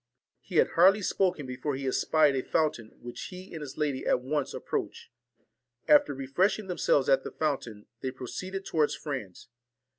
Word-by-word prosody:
He 185 - -10
had - - +5
hardly 195 +4 +5
spoken, 180 -6 0
before 130 +3 -3
he 135 +1 -5
espied 145 +2 +3
a 130 - 0
fountain, 145 -7 -1
which 120 0 -7
he 185 0 -10
and 160 - -6
his 145 -3 -8
lady 145 -4 -1
at - - +3
once 140 +2 -1
approached. - - -4 0.8
After 290 - +5
refreshing 180 +11 0
themselves 165 -6 +1
at 135 - +4
the - - -5
fountain, 125 -9 -3 0.2
they 130 - -2
pro 130 0 -8
ceeded 190 +8 -5
towards 155 -2 +1
France. 130 - -6
145 Hz, 170 wpm, -29 LUFS, 130-180 Hz, 0.8 s, had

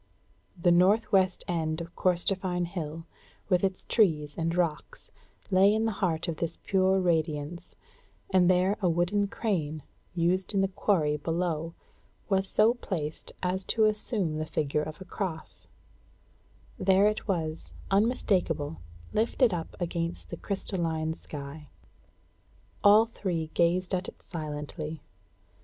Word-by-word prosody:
The 175 0 +4
northwest 190 +1 +3
end 160 -2 -1
of 170 +1 -8
Corstorphine 180 0 +1
Hill, 165 -2 -5 0.4
with 180 -1 +3
its 190 -1 -1
trees 155 -9 +2
and 165 +1 -1
rocks, 170 -4 -2 0.4
lay 195 +2 +6
in 220 +1 +1
the 225 - +1
heart 170 -2 0
of 165 -2 -3
this 165 - -3
pure 190 0 +3
radiance, 160 -2 -1 0.6
and 185 -2 +5
there 185 +3 +3
a 180 - +3
wooden 175 +5 +1
crane, 160 - -2 0.3
used 180 +4 +1
in 195 - +3
the 195 - +3
quarry 185 -6 +1
below, 165 +1 -2 0.5
was 195 -1 +2
so 220 +2 +4
placed 165 -10 -5
as 185 +1 0
to 220 - +2
assume 210 -6 0
the 155 - -3
figure 150 -1 0
of 155 0 -6
a - - -7
cross; 160 - -5 1.1
there 190 +1 +4
it 215 +1 0
was, 165 -5 -2 0.2
unmistakable, 190 - +1 0.4
lifted 230 +1 +2
up 165 -2 -4
against 170 -1 -3
the - - -4
crystalline 165 -5 -1
sky. 145 -1 -9 1.2
All 210 +2 +7
three 175 -8 -3
gazed 180 +2 +2
at 185 +1 -1
it - - -11
silently. 155 -1 -5
175 Hz, 130 wpm, -28 LUFS, 160-195 Hz, 1.2 s, All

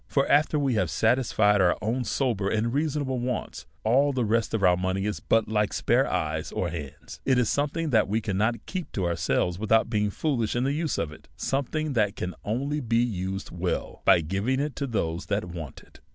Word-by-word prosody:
For, 140 -1 +1
after 150 +1 +4
wc 140 -3 +1
have 95 -7 +1
satisfied 105 - +3
our 90 -1 +3
own 120 +4 -1
sober 110 -8 0
and 110 +3 0
rea 145 +3 +2
sonable 135 -4 -2
wants, 125 +1 -4 0.2
all 135 +6 +3
the 125 -3 0
rest 115 +1 +1
of 105 - -1
our 90 -1 +6
money 95 +2 -1
is 105 - -2
but 115 -1 +2
like 105 -1 0
spare 125 +3 +2
eyes 80 -2 -2
or 90 - -1
hands; 75 -5 -8
it 130 -2 +2
is 125 -3 +2
something 150 +2 -1
that 110 -3 +4
we 105 +3 +1
cannot 110 +2 -1
keep 185 -3 -5
to 95 - -1
ourselves 85 +1 0
without 110 +1 +2
being 105 -2 +1
foolish 120 -1 -1
in 120 - +1
the 135 +2 +1
use 155 +1 -1
of 80 - -2
it, 75 - -14
something 145 +2 -1
that 105 -4 +1
can 90 -7 -4
only 140 +8 -1
be 115 -4 0
used 95 -5 -2
well 90 +1 -3
by 85 - +6
giving 100 +11 -1
it 145 -2 -2
to 140 - -2
those 85 -7 -2
that 100 +1 0
v/ant 85 -6 -8
it. - - -20
110 Hz, 210 wpm, -26 LUFS, 95-130 Hz, 0.2 s, our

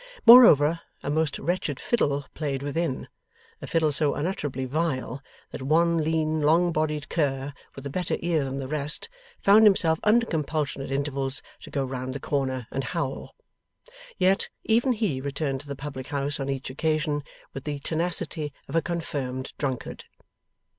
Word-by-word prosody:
Moreover, 170 - +9 0.2
a 145 - -2
most 155 -1 0
wretched 165 -4 -2
fiddle 145 - 0
played 140 -3 -3
within; 145 -1 -2 0.5
a - - -6
fiddle 160 -2 +2
so 145 0 +1
unutterably 145 -5 -2
vile, 135 -3 -2 0.3
that - - -7
one 165 +5 +3
lean 155 0 0
long 165 +4 +4
bodied 155 -1 -1
cur, 140 -3 -1 0.2
with 135 - -9
a - - -3
better 180 +4 -1
ear 165 -3 +1
than 135 0 -4
the 135 -1 -4
rest, 150 - -1 0.3
found 205 +2 +6
himself 170 -6 +4
under 230 +2 +4
compulsion 155 -5 -2
at 135 - -6
intervals 135 -1 -2 0.2
to - - -10
go 140 -2 -1
round 130 0 -4
the - - -3
corner 130 -3 -1
and 135 - -2
howl. 140 -2 -4 0.8
Yet, 190 +1 +2
even 240 +4 +3
he 205 - -1
returned 140 -1 -2
to 145 - -16
the 140 - -4
public 135 -1 -7
house 145 0 -2
on 135 0 -3
each 135 -1 -3
occasion 155 +1 0 0.3
with 135 - -7
the 145 -1 -2
tenacity 160 0 -1 0.2
of - - -6
a 165 - +4
confirmed 135 -7 -4
drunkard. 130 -4 -4
145 Hz, 160 wpm, -26 LUFS, 135-165 Hz, 0.8 s, Moreover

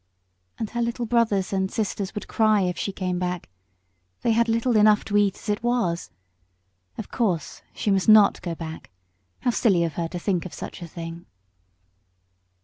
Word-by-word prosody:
And 220 - -4
her 240 - -2
little 235 +1 -1
brothers 215 -5 +1
and 190 -1 0
sisters 205 -1 -3
would 210 - -5
cry 215 -2 +3
if 180 -1 0
she 200 - -3
came 185 -2 -2
back. 180 -1 -3 0.7
They 235 - +2
had 230 +1 +2
little 230 +2 +1
enough 210 0 +5
to 205 - -3
eat 200 -2 +3
as - - -13
it 205 0 0
was. 225 - 0 0.9
Of 220 - -7
course 180 - -1
she 205 - 0
must 195 +1 +2
not 215 -1 +7
go 170 -2 -4
back. 160 -1 -8 0.5
How 245 - +2
silly 195 -7 +3
of 165 -2 -2
her 165 +2 -2
to 175 - -6
think 180 -1 -1
of 185 - -8
such - - -8
a 170 - -6
thing! 165 +1 -8
200 Hz, 180 wpm, -24 LUFS, 175-225 Hz, 0.9 s, not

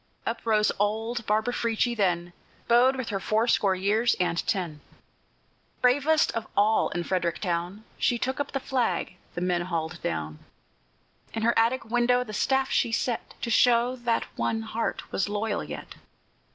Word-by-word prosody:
Up 230 0 -3
rose 215 -1 +3
old 220 +3 -1
Barbara 220 +3 +1
Frietchie 235 +1 0
then, 175 -4 0 0.3
Bowed 245 +3 +5
with 260 -3 -4
her 200 -2 -2
fourscore 215 -1 +2
years 210 +5 +2
and 175 -2 +1
ten; 170 -6 -2 1.0
Bravest 285 +5 +3
of 225 -1 -4
all 210 +2 +3
in 175 - -3
Frederick 170 -2 -1
town, 180 +3 -3 0.2
She 245 - +2
took 260 +3 -2
up 285 - -2
the 275 - -1
flag 250 -8 -1 0.2
the 175 - -3
men 180 -1 +1
hauled 170 -1 -3
down; 80 -1 -3 1.0
In 225 - -2
her 235 +1 +4
attic 230 +3 +2
window 240 +2 +2
the 215 -3 -9
staff 265 +4 +1
she 235 - +2
set, 230 0 -2
To 235 - -1
show 240 +2 +4
that 240 -2 0
one 225 0 -1
heart 225 +1 -3
was 195 - 0
loyal 205 0 -1
yet. - - -8
220 Hz, 160 wpm, -27 LUFS, 185-240 Hz, 1.0 s, Bowed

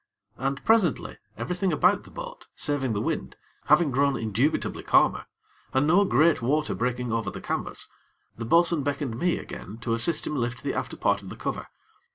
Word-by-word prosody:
And, 135 +2 -3
presently, 215 - +2 0.2
everything 180 +1 -1
about 180 +5 +3
the - - -13
boat, - - -9
saving 140 -6 -1
the 100 - -1
wind, 65 - -3 0.3
having 165 -5 +4
grown 140 +1 +2
indubitably 115 +7 0
calmer, - - +3 0.5
and 135 +2 +4
no 180 +6 +5
great 155 -1 +3
water 150 +6 +1
breaking 125 0 -2
over 115 -1 -1
the - - -7
canvas, - - -2 0.5
the 115 - -5
bo'sun 170 +4 +3
beckoned 140 -4 -2
me 175 -1 +1
again 105 +4 -8
to 115 -1 -1
assist 115 +8 +1
him 150 - -3
lift 125 0 -2
the 140 - -1
after - - -4
part 100 0 +1
of 95 - -10
the - - -7
cover. - - -4
140 Hz, 180 wpm, -26 LUFS, 120-170 Hz, 0.5 s, no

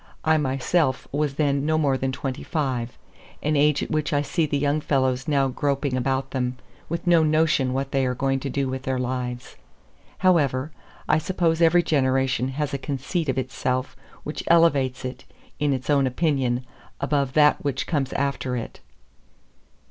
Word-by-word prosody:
I 160 0 +4
myself 135 +1 0
was 145 -1 -1
then 140 -2 +1
no 155 +1 +1
more 145 -4 +2
than 130 0 -1
twenty 130 0 -4
five, 130 -7 -2 0.5
an 150 +1 +1
age 150 0 +3
at - - -6
which 155 +1 0
I 145 0 +2
see 155 +2 0
the 145 - 0
young 145 +2 +1
fellows 130 -1 0
now 140 -3 +2
groping 140 0 -1
about 135 +1 -1
them, 125 -1 -2 0.3
with 170 +1 -3
no 170 -2 +5
notion 155 -4 +2
what 135 +1 -2
they 135 -1 +1
are 125 - -1
going 135 +1 0
to 140 - -4
do 140 +1 -1
with 130 0 -3
their 130 0 -2
lives. 125 -1 -4 0.6
However; 150 -6 +2 0.4
I 155 - +3
suppose 170 -1 0
every 170 +1 +5
generation 130 -3 +1
has 145 +2 -3
a 140 - -2
conceit 145 +4 -3
of 130 - 0
itself 130 0 -2 0.3
which 150 - -5
elevates 140 -7 +3
it, 130 - -6 0.4
in 145 0 +1
its 130 -2 -2
own 140 -2 +3
opinion, 130 -3 0 0.3
above 140 -2 0
that 150 0 +4
which 140 -2 -1
comes 140 -5 -1
after 135 -2 -1
it. 115 - -7
140 Hz, 170 wpm, -24 LUFS, 130-150 Hz, 0.6 s, no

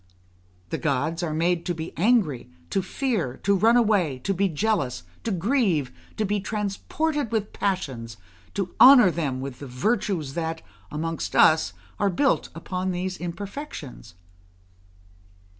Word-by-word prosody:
The - - -2
gods 150 +4 0
are 170 -3 -2
made 170 +2 +1
to 175 - -1
be 160 +1 -6
angry, 185 - +2 0.2
to 195 - +1
fear, 190 - -2
to 200 - +3
run 225 +5 +5
away, 200 - +2
to 195 - 0
be 195 +1 +1
jealous, 155 - -1 0.2
to - - -2
grieve, 190 - +1 0.3
to 215 - +1
be 205 +1 0
transported 220 +8 -2
with 215 -2 -1
passions, 135 - -2 0.4
to 190 -3 -2
honour 250 -8 +9
them 140 -6 -2
with 135 -2 -6
the 140 - -7
virtues 180 - -1
that, 165 0 -3 0.3
amongst 165 +2 -3
us, 155 - +5 0.3
are 200 - +3
built 270 +10 +1
upon 180 +2 -3
these 185 +1 -2
imperfections. 175 - -7
180 Hz, 140 wpm, -25 LUFS, 155-210 Hz, 0.4 s, honour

